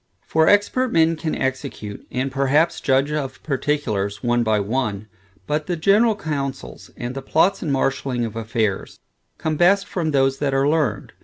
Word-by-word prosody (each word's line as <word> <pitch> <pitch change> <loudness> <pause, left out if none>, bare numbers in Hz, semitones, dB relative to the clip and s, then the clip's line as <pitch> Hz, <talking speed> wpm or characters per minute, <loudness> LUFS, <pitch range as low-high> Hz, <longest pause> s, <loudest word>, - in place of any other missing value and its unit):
For 160 0 +2
expert 230 +5 +3
men 165 0 +3
can 155 0 -3
execute, 130 -6 -4
and 130 +2 -2
perhaps 140 +5 +1
judge 135 +2 +2
of 135 -4 -4
particulars, 130 -9 -2
one 120 0 +2
by 110 -2 +2
one; 105 -1 -2 0.4
but 150 0 -2
the 175 - -1
general 205 +7 +3
counsels, 140 - -5
and 120 +1 -4
the 135 - -5
plots 165 +8 +2
and 155 - -2
marshalling 135 -2 0
of 110 - -7
affairs, 110 -3 -2 0.4
come 155 -1 -2
best, 195 +4 +4
from 175 -5 -2
those 135 -2 +2
that 140 -2 0
are 135 +1 +2
learned. 150 -8 0
135 Hz, 165 wpm, -21 LUFS, 120-160 Hz, 0.4 s, best